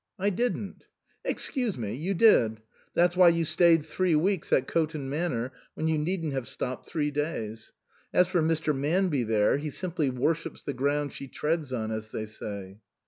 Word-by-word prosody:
" - - -60
I - - +3
didn't." 215 -1 -2 0.2
" - - -41
Excuse 250 - -2
me, 105 -4 -3
you 175 +9 -2
did. 115 - +5 0.3
That's 175 0 +3
why 180 -1 +8
you 170 -1 +1
stayed 165 -1 +4
three 185 -3 +1
weeks 185 +3 +1
at 130 - +4
Coton 155 -4 -1
Manor 135 -6 -1 0.2
when 160 - -1
you 160 -1 +2
needn't 165 -1 -1
have 130 -3 -3
stopped 130 0 -5
three 150 -3 -1
days. 115 -7 -3 0.4
As 180 - +4
for 180 -2 +1
Mr. 160 -1 +1
Manby 150 +1 +1
there, 110 +1 +2
he 150 +1 -4
simply 165 -3 -1
worships 155 +6 -1
the 140 - -3
ground 145 +2 0
she 140 - -7
treads 150 0 -2
on, 110 -3 -2
as 110 0 -4
they 110 - -4
say." 100 -2 -7
150 Hz, 185 wpm, -28 LUFS, 125-170 Hz, 0.4 s, why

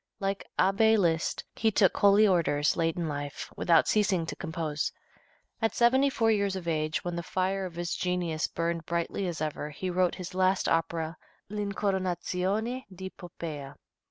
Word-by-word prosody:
Like 195 -1 -2
Abbé 220 +3 +4
Liszt, 165 -4 +1
he 220 - +2
took 195 -3 +3
holy 205 +1 +6
orders 155 -5 +2
late 165 0 0
in 170 -2 -1
life, 145 -1 -5
without 165 -2 +4
ceasing 195 -5 +2
to - - -5
compose. 160 -3 -2 0.7
At 225 - +1
seventy 260 +4 +4
four 225 -4 +2
years 200 -2 +1
of 180 -3 -6
age, 155 -1 0
when 175 -1 -2
the 170 - -2
fire 185 +2 -1
of 170 - -12
his 175 0 -2
genius 175 -3 -1
burned 170 -1 -2
brightly 170 +3 -1
as 170 -3 -4
ever, 150 -1 -3
he 180 +5 -4
wrote 180 0 +2
his 185 0 -7
last 185 +1 +2
opera 165 0 0 0.3
"L'Incoronazione 200 +3 -1
di 190 +1 -7
Poppea." 155 -6 -7
180 Hz, 160 wpm, -29 LUFS, 165-195 Hz, 0.7 s, holy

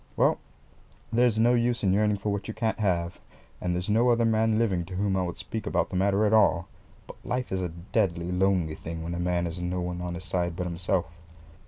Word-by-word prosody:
Well, - - +3 0.7
there's 120 -1 +3
no 120 +2 +4
use 120 -1 +1
yearning 105 +2 +3
for 105 +2 -3
what 100 0 -3
you 110 - -5
can't 115 -1 -1
have, 90 -4 0 0.4
and 90 -1 -1
there's 90 +1 -2
no 115 +4 +3
other 115 -1 +3
man 110 -1 +2
living 100 -7 +1
to 90 +2 -8
whom 100 0 0
I 95 - +1
would 90 -1 -3
speak 110 -1 -5
about - - 0
the - - -4
matter 100 +3 +2
at 105 - +2
all; 90 -5 +4 0.4
but - - -13
life 125 0 -3
is 95 0 -1
a 90 - -2
deadly, 85 0 -1
lonely 90 -3 +1
thing 80 +1 -6
when 85 +1 -4
a 85 - -3
man 90 0 0
has 85 +1 -5
no 90 +1 -2
one 90 0 -3
on 90 -1 -4
his 90 - -7
side 90 -2 -1
but 90 - -3
himself. 90 +1 -1
95 Hz, 225 wpm, -27 LUFS, 90-110 Hz, 0.7 s, no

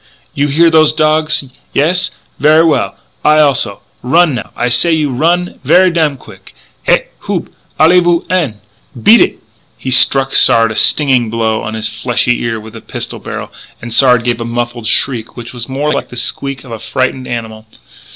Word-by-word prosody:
"You 140 +1 0
hear 165 +4 +3
those 155 -1 +4
dogs? 155 -1 +1 0.3
Yes? 175 +6 +1 0.3
Ver' 155 +3 +4
well; 160 - 0 0.3
I 150 0 +4
also. 140 -9 +1 0.2
Run, 160 +5 +2
now. 120 - -5
I 120 - -1
say 125 +8 +2
to 160 - +2
you 150 -3 -1
run 175 +7 -1
ver' 185 0 +4
damn 155 -4 0
quick. 95 -6 -16 0.3
Hé! - - +3 0.2
Houp! - - -3 0.3
Allez 170 +3 +5
vous 175 -1 +1
en! 155 - -1 0.4
Beat - - +5
eet!" - - 0 0.3
He 130 - -5
struck 135 +1 +5
Sard 115 -1 +4
a - - -6
stinging 130 -5 +2
blow 110 -1 -1
on 110 +1 -5
his 110 0 +1
fleshy 120 +2 -1
ear 115 -1 -3
with 110 0 -12
the 115 - -10
pistol - - -6
barrel, - - -7 0.3
and 120 -1 -7
Sard 125 -1 +4
gave 120 -1 -2
a - - -2
muffled 120 0 -4
shriek 120 -4 -1
which 120 0 -9
was 120 0 -6
more 145 +3 -1
like - - -4
the - - -11
squeak 135 +2 -3
of 125 - -13
a 115 - -6
frightened 130 +1 -3
animal. 110 -2 -6
130 Hz, 185 wpm, -12 LUFS, 115-155 Hz, 0.4 s, Allez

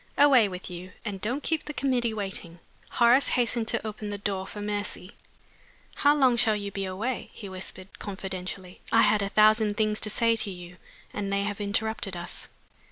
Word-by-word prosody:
Away 270 -6 +6
with 180 0 -7
you 180 0 -8
and 200 -3 -4
don't 250 +7 -2
keep 320 -2 0
the 300 - -6
committee 250 -4 +1
waiting." 195 -5 -5 0.4
Horace 240 +3 +5
hastened 235 -2 +1
to - - 0
open 210 0 -5
the 205 - -3
door 195 -1 -2
for 210 - -8
Mercy. 205 -2 -3 0.8
"How 290 +1 +4
long 260 -4 +4
shall 225 -2 +4
you 200 -1 -4
be 195 0 -3
away?" 215 +7 -3
he 205 - -8
whispered, 185 0 -8
confidentially. 190 -2 -6
"I 225 - +6
had 210 - +4
a 200 - -1
thousand 215 0 +4
things 215 -1 +1
to 215 - +4
say 230 +2 +3
to 215 - +1
you, 180 -1 -9 0.4
and 200 -1 -3
they 200 0 +1
have 205 0 -3
interrupted 205 -2 -1
us." 175 - -6
205 Hz, 185 wpm, -27 LUFS, 190-230 Hz, 0.8 s, Away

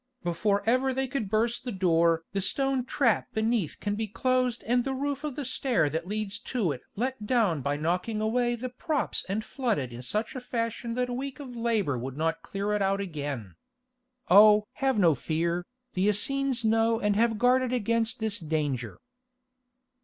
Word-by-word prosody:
"Before 200 +4 +1
ever 255 +2 +2
they 265 0 0
could 245 -6 -3
burst 230 +3 0
the 250 - -4
door 170 -4 +2
the 195 - 0
stone 265 +6 0
trap 245 -4 +1
beneath 220 -6 0
can 205 - -2
be 220 +1 -2
closed 255 +2 0
and 245 +2 +2
the 270 +1 -2
roof 285 +1 -2
of 295 -4 -3
the 290 - -4
stair 240 - +1
that 165 +3 -3
leads 210 0 -3
to 230 - -1
it 130 - -5
let 245 -1 -3
down 210 - +2
by 140 +2 -1
knocking 180 +8 -1
away 240 +3 +1
the 250 +2 -5
props 290 +4 -1
and 215 +3 -2
flooded 210 - -2
in 120 - -7
such 215 - -3
a 255 - -4
fashion 230 -1 -3
that 250 0 0
a - - -3
week 270 +3 -5
of 260 -4 -8
labour 220 - 0
would 130 +2 -6
not 165 +1 0
clear 200 +3 -3
it 210 - 0
out 195 0 +1
again. 145 - -4 0.7
Oh! 210 +2 +7 0.2
have 270 -3 +2
no 175 -6 +5
fear, 170 +5 -1 0.3
the 190 +2 +1
Essenes 260 +3 +1
know 225 +1 +3
and 210 -2 +1
have 225 0 +2
guarded 250 +2 +3
against 230 -1 0
this 220 -1 +1
danger." 150 - -2
220 Hz, 185 wpm, -28 LUFS, 180-250 Hz, 0.7 s, Oh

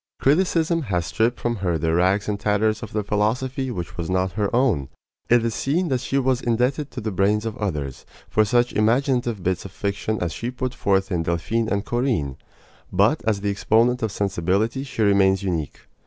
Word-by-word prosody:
Criticism 165 +2 +2
has 90 - -1
stripped 115 +10 0
from 120 -1 -1
her 90 -4 0
the 80 0 0
rags 95 +4 +2
and 105 -1 -2
tatters 105 +1 +1
of - - -7
the 105 0 -1
philosophy 125 +6 -1
which 90 -5 -5
was 85 -1 -3
not 95 0 +1
her 105 0 -1
own. 120 - +1 0.4
It 120 -1 +4
is 115 - 0
seen 165 +9 0
that 130 -2 0
she 135 +2 -1
was 130 -2 +1
indebted 125 +5 0
to 125 - -7
the 110 0 -3
brains 100 +3 +1
of 110 -1 -3
others 75 -10 -3 0.2
for 110 - +3
such 120 +3 +2
imaginative 120 -1 +1
bits 90 -1 -1
of 95 - -9
fiction 100 +3 -2
as 85 -2 -2
she 120 - -4
put 125 0 -3
forth 95 -1 0
in 85 -2 +1
Delphine 85 +8 -1
and 100 0 -1
Corinne; 120 - -1 0.5
but 105 +11 +3
as 105 -3 +1
the 100 0 0
exponent 115 +5 +2
of 110 -2 -1
sensibility 100 +6 0
she 130 -5 -2
remains 100 -1 +3
unique. 85 -7 -3
105 Hz, 195 wpm, -23 LUFS, 95-125 Hz, 0.5 s, It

